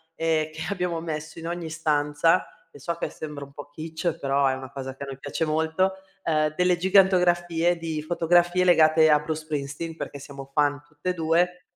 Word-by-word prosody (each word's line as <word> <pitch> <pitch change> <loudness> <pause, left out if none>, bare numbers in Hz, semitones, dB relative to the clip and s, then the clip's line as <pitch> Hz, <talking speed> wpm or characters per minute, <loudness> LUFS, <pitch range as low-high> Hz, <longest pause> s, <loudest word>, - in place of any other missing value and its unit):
e 160 -1 0
che 160 - -8
abbiamo 180 -4 -1
messo 155 0 -5
in 165 - -6
ogni 170 -1 -4
stanza, 155 +1 +2 0.3
e 145 - -14
so 170 +5 -2
che - - -3
sembra 150 -2 -7
un 140 - -19
po' 145 0 -10
Kitsch, 160 +3 -4
però 140 0 +1
è 130 - +2
una 130 0 -7
cosa 135 -1 -6
che 140 - -8
a - - -4
noi 135 -1 -7
piace 145 +3 -2
molto, 160 +5 +1 0.3
uhm, 155 -1 +1
delle 180 -1 +3
gigantografie 175 -2 +3
di 160 -2 -3
fotografie 175 +2 +2
legate 160 -2 +5
a 150 0 +6
Bruce 155 +1 -4
Springsteen, 150 +2 -4
perché 140 - -6
siamo 135 -1 -10
fan 145 -1 +2
tutte 150 +3 -6
e - - -2
2 175 +2 +1
160 Hz, 195 wpm, -25 LUFS, 145-175 Hz, 0.3 s, a